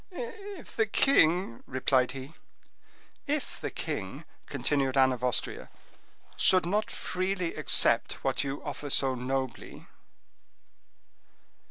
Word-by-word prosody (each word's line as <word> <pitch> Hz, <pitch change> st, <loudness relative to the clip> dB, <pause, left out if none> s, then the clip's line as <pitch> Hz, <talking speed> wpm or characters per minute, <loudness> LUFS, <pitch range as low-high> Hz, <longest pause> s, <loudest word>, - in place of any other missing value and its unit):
"If 375 Hz, -, -8 dB
the 225 Hz, -1 st, +2 dB
king—" 180 Hz, -, +3 dB
replied 130 Hz, -1 st, +1 dB
he. 135 Hz, +3 st, -8 dB, 0.9 s
"If 290 Hz, 0 st, -3 dB
the -, -, -2 dB
king," -, -, -5 dB, 0.2 s
continued 135 Hz, -2 st, 0 dB
Anne 130 Hz, -1 st, +5 dB
of 125 Hz, -1 st, -5 dB
Austria, 125 Hz, -2 st, -1 dB, 0.7 s
"should 185 Hz, -2 st, +5 dB
not 210 Hz, +5 st, 0 dB
freely 185 Hz, -2 st, -2 dB
accept -, -, +2 dB
what -, -, 0 dB
you 140 Hz, 0 st, -5 dB
offer 145 Hz, -, -6 dB
so 135 Hz, -1 st, +4 dB
nobly." 130 Hz, 0 st, -4 dB
145 Hz, 110 wpm, -29 LUFS, 130-200 Hz, 0.9 s, Anne